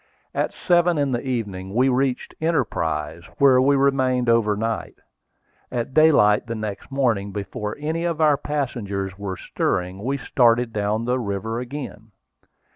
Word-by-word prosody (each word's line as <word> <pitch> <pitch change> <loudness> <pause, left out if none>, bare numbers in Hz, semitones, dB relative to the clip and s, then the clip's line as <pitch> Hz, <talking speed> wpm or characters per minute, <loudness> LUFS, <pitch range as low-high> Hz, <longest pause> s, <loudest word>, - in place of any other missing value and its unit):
At - - -1
seven 175 -1 +2
in 140 -2 +1
the 120 -1 -1
evening 105 -7 -4
we 130 +2 +4
reached 130 0 0
Enterprise, 85 - -1
where 130 -2 +5
we 140 +2 +4
remained 130 -3 +2
overnight. 115 -1 0 0.8
At 125 +1 -3
daylight 130 -9 +5
the 115 - -3
next 110 -2 -5
morning, 120 -8 0
before 105 +1 -5
any 160 +3 -2
of 165 -2 -1
our 155 -2 +5
passengers 100 -10 -3
were 95 -2 -4
stirring, 90 +3 -2
we 135 +3 -1
started 120 -2 +2
down 105 +2 -1
the 125 +1 0
river 110 +1 -3
again. 120 -5 -7
120 Hz, 140 wpm, -23 LUFS, 105-135 Hz, 0.8 s, where